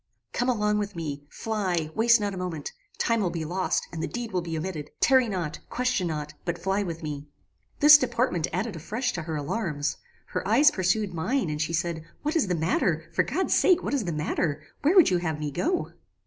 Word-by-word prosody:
"Come 245 - 0
along 210 -3 +1
with 205 -2 -4
me: 145 -3 -5
fly: 185 -8 -2
waste 235 +1 +5
not 205 -1 -2
a - - -6
moment: 175 -5 -4 0.3
time 230 -1 +1
will 185 - +1
be 165 -2 -4
lost, 185 +4 -1
and 165 - -4
the - - -1
deed 240 -2 -5
will 180 -2 0
be 165 -1 -4
omitted. 155 -3 -4
Tarry 260 -3 +4
not; 170 -6 -3
question 245 -7 0
not; 150 -2 -4
but 170 -1 -2
fly 195 +3 0
with 165 -4 -5
me! 145 -1 -5 0.5
"This 300 0 +10
deportment 240 - 0
added 195 +2 -2
afresh 225 - -2
to 170 - -3
her 160 0 -4
alarms. 150 -1 -2 0.3
Her - - -3
eyes 260 +9 +6
pursued 185 +1 0
mine, 180 - 0
and 150 0 -3
she 160 +2 -1
said, 170 -1 -1 0.2
"What 300 +2 -1
is 315 -11 +2
the 180 - 0
matter? 160 0 0
For - - +3
God's 380 - 0
sake 365 -2 +4
what - - -2
is 265 -7 0
the 175 - -1
matter? 155 -1 -1 0.2
Where 315 +7 +3
would 355 - +7
you 180 - +3
have 160 -3 -2
me 150 -1 -3
go?" 345 - -1
180 Hz, 215 wpm, -27 LUFS, 160-230 Hz, 0.5 s, This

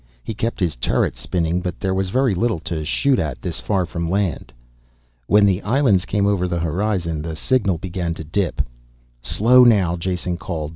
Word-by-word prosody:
He - - -4
kept 115 +2 -3
his 90 -5 0
turret - - 0
spinning, 85 0 -1
but 90 -1 -4
there 95 -2 -1
was 95 0 -1
very 130 +1 +2
little 110 +3 0
to 80 -2 -4
shoot 130 - +1
at 75 -6 -3
this 85 -3 -4
far 95 -4 0
from 85 0 -4
land. 95 -2 -1 0.8
When 105 0 +5
the 95 -1 +2
islands 110 -5 +2
came 100 -1 0
over 100 -3 +1
the 85 -1 -2
horizon 85 -1 -1
the 80 0 -5
signal 100 -2 +1
began 85 -1 -3
to 80 - -7
dip. 95 +5 -1 0.6
"Slow 125 - +5
now," 95 -8 +4
Jason 90 0 -2
called. 80 -4 -4
90 Hz, 185 wpm, -21 LUFS, 85-105 Hz, 0.8 s, When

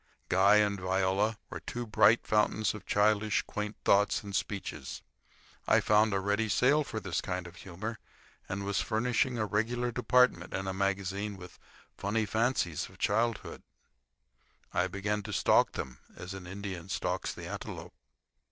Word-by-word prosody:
Guy 95 +3 +5
and 105 -2 +3
Viola 95 +3 +1
were - - -5
two 120 0 -5
bright 115 +1 +4
fountains 105 0 +2
of 105 -3 -10
childish, 105 0 +2
quaint 105 0 -4
thoughts 100 +1 +3
and 100 -1 -6
speeches. 100 0 -4 0.6
I - - +5
found 105 +1 +4
a 100 - +1
ready 105 +3 0
sale 140 +8 +4
for 110 -5 -5
this 95 -6 -2
kind 90 -1 -3
of 90 +1 -11
humor, 105 +5 -6 0.5
and 100 +1 -3
was 100 0 0
furnishing 120 +2 0
a 110 - 0
regular 120 +4 0
department 125 -6 +2
in 95 - -3
a 95 - -1
magazine 100 +1 -1
with 90 -1 -12 0.4
"Funny 105 +2 0
Fancies 110 - 0
of - - -17
Childhood." 110 +2 0 1.1
I 90 +1 +2
began 100 +2 -2
to - - -7
stalk - - +3
them 65 -1 -6 0.2
as 90 +2 -7
an 95 -2 -8
Indian 95 -2 -6
stalks - - -2
the - - -8
antelope. - - -7
105 Hz, 155 wpm, -31 LUFS, 95-110 Hz, 1.1 s, Guy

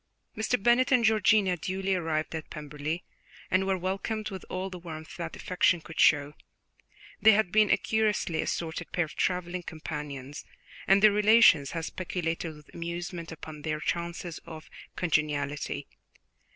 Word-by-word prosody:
Mr. 220 +3 +1
Bennet 240 +3 +4
and 250 -3 +4
Georgiana 215 -3 +4
duly 190 +3 -2
arrived 160 -4 -1
at 160 -1 -5
Pemberley, 150 +2 -5 0.5
and 190 +1 +2
were 190 -1 +1
welcomed 195 +4 -3
with 190 -2 -7
all 185 +1 -3
the 180 - -7
warmth 160 0 -8
that 170 -2 -5
affection 180 -1 +2
could 160 0 -10
show. 145 -1 +4 0.9
They 220 0 +8
had 200 -4 +2
been 215 -1 +4
a - - +5
curiously 210 -7 0
assorted 165 +1 -4
pair 175 - +1
of 155 - -12
travelling 180 0 -1
companions, 150 -4 -6 0.4
and 195 +2 +5
their 215 - +8
relations 210 -8 +5
had 165 -1 -3
speculated 170 -3 -3
with 150 -1 -17
amusement 170 0 -5
upon 155 -1 -9
their 155 0 -2
chances 170 0 -3
of 160 -2 -11 0.2
congeniality. 150 -4 -1
175 Hz, 150 wpm, -28 LUFS, 155-195 Hz, 0.9 s, They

